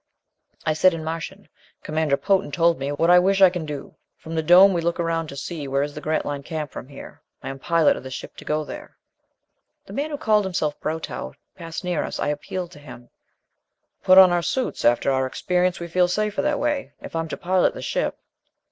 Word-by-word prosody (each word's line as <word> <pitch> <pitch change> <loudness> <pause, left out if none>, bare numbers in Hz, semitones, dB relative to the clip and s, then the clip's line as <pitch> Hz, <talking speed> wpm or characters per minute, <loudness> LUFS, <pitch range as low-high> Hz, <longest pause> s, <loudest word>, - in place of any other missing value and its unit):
I 155 - +2
said 175 +3 +4
in 160 - -6
Martian, 165 +1 -6 0.4
"Commander 155 -2 0
Potan 195 +5 +1
told 170 -1 +2
me, 135 +1 -2
what 165 +4 +2
I 180 - +8
wish 195 +2 +2
I 190 -2 +7
can 175 -4 -5
do. 145 -2 -7 0.2
From 160 - -9
the 160 - 0
dome 180 +5 +7
we 170 - 0
look 170 +1 -1
around 165 -1 -1
to 140 - -9
see 150 0 -5
where 135 +1 +1
is 145 0 -5
the 150 - -8
Grantline 145 -2 -2
camp 155 0 -5
from 130 - -8
here. 140 -1 -12 0.2
I - - -5
am 135 0 -7
pilot 165 +1 +3
of - - -7
this 130 -1 -7
ship - - -9
to - - -10
go 155 0 -1
there." 300 - -10 0.9
The - - -11
man 290 +3 -2
who 300 - -3
had - - -11
called 210 -2 +3
himself 155 -5 -2
Brotow 155 - -4 0.2
passed 165 +2 -7
near 180 -3 -1
us. - - -5
I - - 0
appealed 170 +4 -4
to - - -13
him. 125 -4 -13 0.9
"We - - -32
put 185 0 +7
on 190 -1 +9
our 175 0 +2
suits. 255 +9 -2
After 120 +3 +3
our 130 0 +1
experience, 180 +5 0
we 170 - -5
feel 180 +1 +2
safer 210 +3 -1
that 295 -1 0
way. 295 -2 -2
If - - -10
I'm 165 0 -1
to - - -5
pilot 185 +1 +1
the - - -7
ship...." - - -2
165 Hz, 230 wpm, -23 LUFS, 150-185 Hz, 0.9 s, on